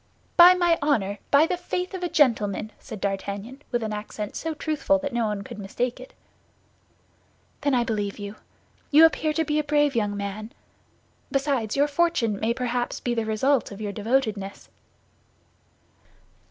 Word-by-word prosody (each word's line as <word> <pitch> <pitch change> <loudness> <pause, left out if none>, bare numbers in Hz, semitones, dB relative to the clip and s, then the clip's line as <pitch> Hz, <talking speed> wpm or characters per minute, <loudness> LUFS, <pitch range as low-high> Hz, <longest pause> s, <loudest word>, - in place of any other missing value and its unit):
"By 355 +1 +9
my 345 -2 +2
honor, 210 -9 0
by 285 +2 +6
the 360 - -1
faith 360 +1 -3
of 375 - -5
a 355 - -1
gentleman!" 220 -8 +2
said 220 -6 -9
D'Artagnan, 200 +6 -4
with 240 -2 0
an 215 -1 -3
accent 210 0 -6
so 325 -1 -3
truthful 300 -1 +1
that 285 -2 -4
no 235 -2 +1
one 205 -1 -3
could 215 +2 -9
mistake 240 +6 -3
it. 255 - -12 1.5
"Then 285 -2 +2
I 240 - +3
believe 205 -3 -2
you. 205 0 -7 0.5
You 310 +2 +8
appear 315 -1 +2
to 320 +1 0
be 300 0 +1
a - - 0
brave 295 -1 +2
young 205 -3 0
man; 205 +2 -5 0.8
besides, 270 -6 0
your 285 +1 +4
fortune 285 -10 +1
may 225 - +1
perhaps 245 0 -2
be 245 - -1
the 230 -2 -1
result 235 +5 +1
of 200 - -9
your 210 -1 -3
devotedness." 215 -3 -2
240 Hz, 165 wpm, -25 LUFS, 210-295 Hz, 1.5 s, By